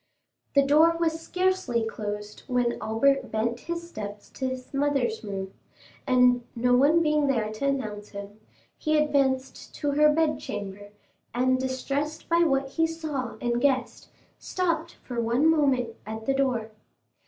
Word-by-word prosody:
The 280 - +6
door 315 +4 +5
was 325 -1 0
scarcely 365 -11 0
closed 210 -1 -5
when 245 -1 0
Albert 265 +4 +2
bent 230 +2 -1
his 340 +3 -5
steps 205 -9 -8
to 260 - -3
his 260 +1 -7
mother's 275 -6 0
room; 195 -2 -5 0.5
and, 250 -1 +4
no 245 +1 +2
one 300 +6 +5
being 300 -2 +2
there 225 -6 0
to 245 +6 -2
announce 215 -7 -2
him, 200 +1 -9 0.4
he 310 0 +1
advanced 275 -3 0
to 290 -1 -1
her 300 +1 +5
bedchamber, 205 -11 -2 0.5
and 255 +1 +2
distressed 275 +4 -3
by 335 0 +4
what 275 -5 +2
he 325 +4 +1
saw 300 -8 -4
and 240 0 0
guessed, 260 -3 0 0.3
stopped 335 -2 -1
for 240 -2 -3
one 240 +7 +2
moment 270 -7 +2
at 220 0 -6
the 270 - +2
door. 250 -5 0
260 Hz, 145 wpm, -26 LUFS, 230-300 Hz, 0.5 s, The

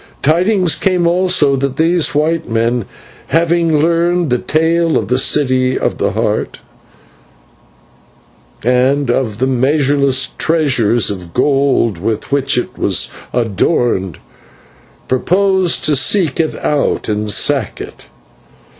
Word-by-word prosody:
Tidings 180 +3 +2
came 180 -2 0
also 175 -5 +2
that 135 0 -3
these 165 -3 +1
white 160 0 0
men, 115 0 -1 0.4
having 165 -1 +1
learned 170 0 +1
the 125 - +1
tale 165 +3 0
of 105 - -3
the 125 +1 +1
City 130 -2 +1
of - - -2
the - - -1
Heart - - -2 2.1
and 125 +2 +1
of 120 -5 -2
the 130 - 0
measureless 135 +1 +1
treasures 120 - +1
of 90 -4 -9
gold 135 - +1
with 110 +6 -4
which 140 -1 0
it 125 - -1
is - - +1 0.2
adorned, 115 - -1 0.9
purposed 185 +6 +1
to 150 - +2
seek 160 +3 +1
it 160 -1 0
out 150 -1 0
to 105 0 -3
sack 105 - 0
it. - - -10
140 Hz, 120 wpm, -14 LUFS, 125-165 Hz, 2.1 s, Tidings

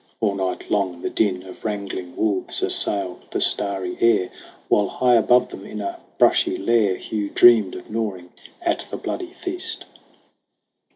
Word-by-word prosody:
All 105 -3 +1
night 95 -2 -3
long, 95 -4 -1
the - - -2
din 95 -4 0
Of 95 -1 -12
wrangling 100 -4 -4
wolves 100 -4 0
assailed 95 -3 0
the - - -2
starry 95 -3 0
air, 115 -6 +3 0.4
While 105 -1 +3
high 125 +5 +2
above 125 +2 +4
them 95 - -9
in 105 +1 -7
a 100 -1 -4 0.2
brushy - - +3
lair 105 -2 +2
Hugh 105 0 -4
dreamed 115 -6 +5
of - - -9
gnawing 100 -6 -4 0.3
at 340 -1 +1
the - - -5
bloody 360 -2 -5
feast. 360 0 -2
100 Hz, 155 wpm, -22 LUFS, 95-115 Hz, 0.4 s, dreamed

